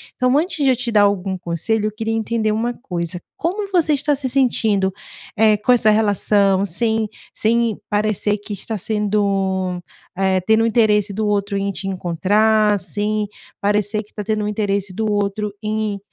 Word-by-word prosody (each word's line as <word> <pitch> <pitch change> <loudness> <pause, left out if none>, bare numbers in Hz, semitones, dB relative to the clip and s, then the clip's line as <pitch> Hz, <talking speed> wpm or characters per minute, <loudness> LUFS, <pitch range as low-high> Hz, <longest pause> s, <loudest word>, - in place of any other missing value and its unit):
Então, 255 +1 +2
antes 315 -1 -1
de 270 - +4
eu 260 - +4
te 245 0 -4
dar 210 -2 +5
algum 195 -2 +1
conselho, 185 +5 -1
eu - - -3
queria 225 +1 -3
entender 225 0 0
uma 225 +3 0
coisa, 180 -8 -5 0.2
como 395 +5 -2
você 330 -5 +3
está 290 +1 +1
se 270 -1 -3
sentindo, 220 -7 +1 0.4
eh, 215 -1 +4
com 210 +5 +1
essa 235 -3 +4
relação, 205 -2 +2
sem 220 +4 0 0.2
sem 230 -1 +1
parecer 210 0 +1
que 205 +1 -8
está 215 +3 -4
sendo, 195 -3 -1 0.3
eh, 190 0 +2
tendo 220 +4 +3
o - - +3
interesse 210 -3 +2
do 215 +2 -2
outro 200 -1 0
em 200 0 -1
te 195 +1 -5
encontrar, 205 +4 +2
sem 210 +1 -2 0.3
parecer 210 +1 0
que 210 - -26
tá 210 - -5
tendo 215 0 -1
um - - -1
interesse 200 -2 -1
do 220 +2 -1
outro 205 +1 -1
em 215 -1 -2
210 Hz, 175 wpm, -20 LUFS, 200-225 Hz, 0.4 s, dar